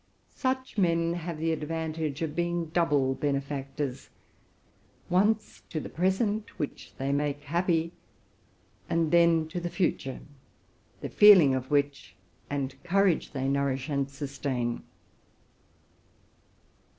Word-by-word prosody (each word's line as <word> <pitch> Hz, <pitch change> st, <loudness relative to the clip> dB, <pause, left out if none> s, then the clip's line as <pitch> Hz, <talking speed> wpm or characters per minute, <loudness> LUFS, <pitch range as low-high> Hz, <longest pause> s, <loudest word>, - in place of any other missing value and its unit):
Such 260 Hz, -4 st, -2 dB
men 170 Hz, -2 st, +2 dB
have 170 Hz, -1 st, -4 dB
the 165 Hz, +1 st, 0 dB
advantage 160 Hz, -1 st, -3 dB
of 155 Hz, -1 st, -3 dB
being 175 Hz, -1 st, -1 dB
double 150 Hz, -6 st, +2 dB
benefactors: 140 Hz, -1 st, -3 dB, 1.0 s
once 210 Hz, +4 st, +1 dB
to 155 Hz, -, -2 dB
the -, -, -7 dB
present, 205 Hz, +4 st, 0 dB
which 145 Hz, -, -5 dB
they 135 Hz, +1 st, -1 dB
make 145 Hz, 0 st, -1 dB
happy; 170 Hz, +1 st, 0 dB, 1.0 s
and 165 Hz, -2 st, +1 dB
then 170 Hz, -2 st, +4 dB
to 175 Hz, -, -3 dB
the 175 Hz, 0 st, -3 dB
future, 165 Hz, -8 st, -1 dB, 0.8 s
the -, -, -4 dB
feeling 190 Hz, -10 st, +8 dB
of 130 Hz, 0 st, -2 dB
which 145 Hz, -1 st, 0 dB, 0.3 s
and 135 Hz, -1 st, -3 dB
courage 185 Hz, -1 st, +2 dB
they 135 Hz, -1 st, -1 dB
nourish 140 Hz, 0 st, 0 dB
and 140 Hz, -2 st, 0 dB
sustain. 135 Hz, -3 st, -3 dB
155 Hz, 115 wpm, -28 LUFS, 140-175 Hz, 1.0 s, feeling